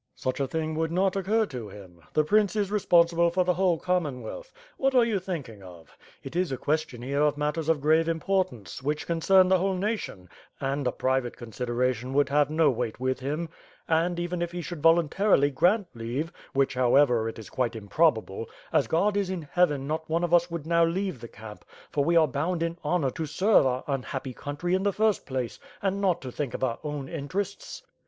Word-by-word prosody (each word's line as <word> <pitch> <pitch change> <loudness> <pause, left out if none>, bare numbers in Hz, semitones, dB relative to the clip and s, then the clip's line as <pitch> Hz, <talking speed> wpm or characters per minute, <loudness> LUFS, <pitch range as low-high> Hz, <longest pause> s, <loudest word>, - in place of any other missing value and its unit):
"Such 130 +1 -3
a 135 - 0
thing 160 +3 -2
would 160 0 0
not 185 +2 +1
occur 210 +4 +1
to 125 - -7
him. 95 -4 -13
The 155 - +3
prince 210 +5 +2
is 205 -2 0
re 210 - +1
sponsible 170 -2 +4
for 185 +1 +2
the 180 0 +2
whole 180 -2 +2
Commonwealth. 180 - -3 0.3
What 270 0 +1
are 245 -2 +6
you 220 -4 0
thinking 145 - -6
of? 90 -3 -14 0.3
It - - -8
is 180 -3 0
a 130 - -2
question 150 -5 -2
here 140 +3 -1
of 150 -1 +2
matters 150 +2 -1
of 160 -3 +2
grave 160 +3 +3
im 165 0 -1
portance, 170 - -2
which 150 +3 -2
concern 185 +3 +4
the 185 0 +4
whole 190 +1 0
nation, 190 - -3 0.3
and 135 0 -1
a - - +2
private 130 -1 -1
con 120 -2 -10
sideration 125 +1 -1
would 145 0 +3
have 145 0 +3
no 155 -1 +3
weight 120 -2 -3
with 130 0 -1
him. 150 +5 -3 0.4
And, 170 +2 +1
even 175 0 -3
if 175 0 -3
he 175 - -3
should 170 -2 -6
voluntarily 165 -1 +4
grant 190 +10 +3
leave 120 +8 -4
— - - -24
which 135 0 +2
however 125 -2 +3
it 110 -1 -10
quite 120 -3 -1
improbable 110 -2 0
— - - -24
ae - - +5
God 170 - +1
is 200 -2 0
in 185 -3 -3
Heaven 145 -3 +1
not 160 +2 -3
one 165 +2 +1
of 175 0 -1
us 175 0 +4
would 170 -3 -5
now 170 0 +3
leave 175 - -1
the 115 - -7
camp, 105 -1 -11 0.3
for 145 - +1
we 170 +4 +2
are 160 -2 +6
bound 160 +5 -1
in 170 0 -2
honor 150 -3 +1
to 160 +4 -4
serve 185 +1 +4
our 130 0 -1
un 135 -2 -1
happy 130 0 -5
country 145 +8 -3
in 190 - +2
the 200 0 +1
first 215 -1 +1
place, 130 -3 -3 0.2
and 195 0 -1
not 180 -3 +1
to 130 - -6
think 135 -1 -4
of - - -4
our 120 -3 -1
own 145 -3 -4
interests." 185 +7 -5
155 Hz, 220 wpm, -27 LUFS, 130-180 Hz, 0.4 s, are